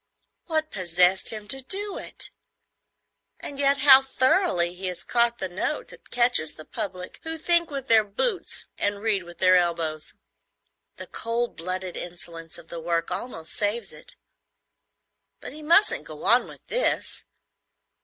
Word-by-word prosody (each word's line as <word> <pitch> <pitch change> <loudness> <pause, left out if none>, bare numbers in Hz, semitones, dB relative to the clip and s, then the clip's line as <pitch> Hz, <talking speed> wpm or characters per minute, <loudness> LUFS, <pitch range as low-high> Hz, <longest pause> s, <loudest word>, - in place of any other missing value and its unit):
What 315 -2 -1
possessed 180 +1 +4
him 215 -2 -1
to 270 +3 +3
do 400 +8 -1
it? - - -6 1.1
And 280 - -5
yet 280 0 +4
how 265 -1 +8
thoroughly 260 - +2
he 185 +1 -6
has 180 -1 -5
caught 235 -1 +1
the 190 - -2
note 180 +1 -3
that - - -15
catches 240 -10 +2
a 155 - -9
public 190 -5 -6
who 325 0 -5
think 340 +1 +2
with 275 -2 -5
their 220 -1 +7
boots 360 - 0
and 205 0 -1
read 215 -3 +1
with 175 0 -13
their 185 0 +5
elbows! 165 -3 0 0.8
The - - -8
cold 235 +1 -2
blooded 185 +2 -4
insolence 170 -2 -6
of 165 - -14
the 170 - -6
work 165 0 -1
almost 165 -10 -5
saves 210 +3 -2
it; - - -10 1.2
but - - -8
he 305 - -9
mustn't 340 +7 +3
go - - -9
on - - +4
with - - -14
this. - - -1
210 Hz, 155 wpm, -25 LUFS, 175-275 Hz, 1.2 s, how